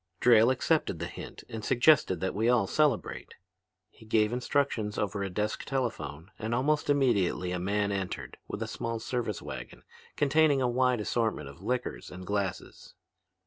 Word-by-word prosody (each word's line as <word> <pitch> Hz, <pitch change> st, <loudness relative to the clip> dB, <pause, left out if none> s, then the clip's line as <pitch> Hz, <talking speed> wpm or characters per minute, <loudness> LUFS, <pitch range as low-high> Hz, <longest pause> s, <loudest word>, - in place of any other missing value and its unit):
"Drayle 115 Hz, -1 st, +6 dB
accepted 140 Hz, -, +1 dB
the 85 Hz, -, -4 dB
hint 85 Hz, -, -9 dB
and 110 Hz, -1 st, -6 dB
suggested 120 Hz, -, +4 dB
that 95 Hz, -, -1 dB
we 110 Hz, +4 st, +1 dB
all 120 Hz, -5 st, +4 dB
celebrate. 145 Hz, +1 st, 0 dB, 0.6 s
He -, -, -18 dB
gave 110 Hz, 0 st, +2 dB
instructions 125 Hz, -4 st, 0 dB
over 105 Hz, -1 st, -1 dB
a 100 Hz, -, -2 dB
desk 105 Hz, +3 st, -2 dB
telephone 95 Hz, -, -3 dB
and 110 Hz, +2 st, -1 dB
almost 145 Hz, +5 st, +1 dB
immediately 110 Hz, -10 st, +2 dB
a 90 Hz, -, -2 dB
man 100 Hz, +2 st, 0 dB
entered 95 Hz, -2 st, -4 dB
with -, -, -4 dB
a -, -, -5 dB
small 115 Hz, 0 st, -3 dB
service 115 Hz, -2 st, -3 dB
wagon -, -, -8 dB, 0.3 s
containing 145 Hz, 0 st, +3 dB
a 130 Hz, -, +2 dB
wide 125 Hz, -1 st, +2 dB
assortment 110 Hz, -, -1 dB
of 70 Hz, +5 st, -14 dB
liquors 105 Hz, -, -3 dB
and 90 Hz, 0 st, -9 dB
glasses. 100 Hz, -2 st, -4 dB
110 Hz, 160 wpm, -29 LUFS, 100-125 Hz, 0.6 s, Drayle